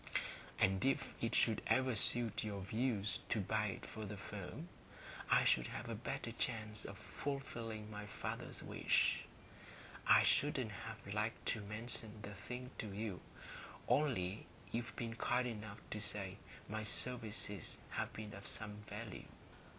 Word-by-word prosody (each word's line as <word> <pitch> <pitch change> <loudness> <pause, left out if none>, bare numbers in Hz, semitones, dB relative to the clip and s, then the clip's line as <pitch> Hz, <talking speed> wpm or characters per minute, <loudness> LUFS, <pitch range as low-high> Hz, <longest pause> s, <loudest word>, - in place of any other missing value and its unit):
And 95 0 +4
if 135 +1 +2
it 115 - +2
should 110 -2 +4
ever 130 -1 +4
suit 115 +1 +5
your 100 -2 -2
views 105 0 0
to 110 - +2
buy 105 +2 +2
it 100 - -4
for 110 - -6
the 105 0 -4
firm, - - -6 0.6
I - - +7
should 60 -1 +4
have 120 - -5
a - - -1
better 120 +2 -3
chance 110 -3 -1
of - - -6
fulfilling 115 -6 -4
my 105 0 -5
father's - - -4
wish. - - +3 0.9
I - - +9
shouldn't 130 -6 +3
have 110 -1 -6
liked 105 +2 -1
to 110 - -4
mention 110 +1 -1
the 100 - -5
thing 125 +6 -6
to 110 - -2
you, 100 -2 -3 0.7
only 110 -10 +2 0.2
you've 115 +1 -2
been 115 -1 -2
kind 125 +2 +2
enough 110 -2 -5
to 105 - -2
say 100 -2 0 0.3
my 110 +1 -2
services 110 -2 +2
have - - -1
been 105 -1 -6
of 100 0 -7
some 105 -2 -1
value. 105 0 -6
110 Hz, 150 wpm, -39 LUFS, 105-120 Hz, 0.9 s, I